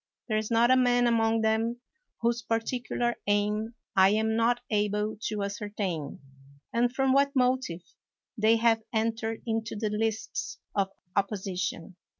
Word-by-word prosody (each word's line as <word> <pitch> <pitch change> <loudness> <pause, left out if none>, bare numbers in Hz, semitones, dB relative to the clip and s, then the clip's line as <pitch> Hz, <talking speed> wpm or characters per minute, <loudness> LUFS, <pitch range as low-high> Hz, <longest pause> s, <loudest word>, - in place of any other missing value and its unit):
There 215 -3 +1
is 215 - -4
not 235 +1 +4
a - - +7
man 245 -1 +4
among 225 -1 +2
them 225 +2 +1 0.4
whose 235 0 +1
particular 240 +1 -1
aim 210 +2 0 0.2
I 190 0 +6
am 220 +2 +1
not 235 +2 +2
able 210 0 0
to 210 -2 -2
ascertain, 200 -6 -4 0.5
and 240 +1 +2
from 265 0 +2
what 280 +1 +3
motive 250 -9 +1 0.5
they 220 0 +4
have 225 0 +3
entered 225 0 -1
into 225 -1 -2
the 215 0 -2
lists 220 +1 -2 0.2
of 195 -2 +1 0.3
oppo 200 +1 +1
sition. 185 -2 -4
220 Hz, 145 wpm, -28 LUFS, 210-235 Hz, 0.5 s, a